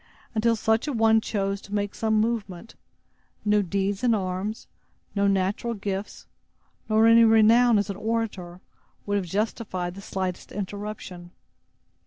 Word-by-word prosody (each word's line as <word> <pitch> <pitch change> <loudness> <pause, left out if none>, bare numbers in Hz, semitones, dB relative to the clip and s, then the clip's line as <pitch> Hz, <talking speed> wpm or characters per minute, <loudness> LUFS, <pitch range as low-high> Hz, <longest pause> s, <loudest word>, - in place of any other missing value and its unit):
Until 230 +1 +2
such 220 +4 +1
a 290 - -1
one 225 -1 +4
chose 200 -2 -2
to 205 - -6
make 205 -1 -1
some 220 -1 +1
movement, 215 -3 -3 0.7
no 210 0 +3
deeds 195 +3 -2
in 235 -2 +4
arms, 190 +2 -3 0.5
no 200 -1 +1
natural 200 +4 0
gifts, 200 0 -5 0.6
nor 220 +1 +4
any 230 0 +7
renown 225 +1 +5
as 205 0 0
an 195 - -7
orator, 205 -6 -3 0.4
would 205 0 0
have 190 -3 -3
justified 190 -2 -2
the 195 - -10
slightest 185 -2 -4
interruption. 200 -3 -6
205 Hz, 140 wpm, -25 LUFS, 195-225 Hz, 0.7 s, any